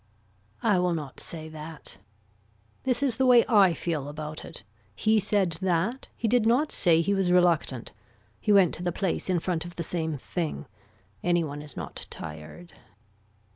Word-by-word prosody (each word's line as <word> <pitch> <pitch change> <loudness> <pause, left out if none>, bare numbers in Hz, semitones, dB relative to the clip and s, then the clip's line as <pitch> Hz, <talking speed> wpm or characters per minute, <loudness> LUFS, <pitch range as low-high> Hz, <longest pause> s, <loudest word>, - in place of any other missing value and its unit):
I 195 -3 +3
will 180 -1 +1
not 145 -4 -6
say 160 -2 -7
that. 155 -10 -9 0.9
This 260 +1 +1
is 250 -5 +1
the 265 - +2
way 245 -2 +7
I 195 -7 +5
feel 155 -5 -2
about 150 +1 -6
it. - - -8 0.3
He 220 0 +3
said 195 -5 0
that. 190 +8 0
He 230 - -1
did 240 +1 +3
not 265 +6 +3
say 165 -3 +3
he 200 +5 +1
was 190 -2 +1
reluctant. 170 -8 +2 0.5
He 210 - 0
went 195 -4 +5
to 175 - -6
the 175 - 0
place 190 +1 -2
in 180 - +2
front 165 -1 -2
of 175 0 -10
the 170 - -3
same 160 -2 -2
thing. 150 - -4 0.6
Any 175 -1 +2
one 145 -1 -5
is 150 -3 -11
not - - -5
tired. 80 - -9
175 Hz, 175 wpm, -27 LUFS, 155-200 Hz, 0.9 s, way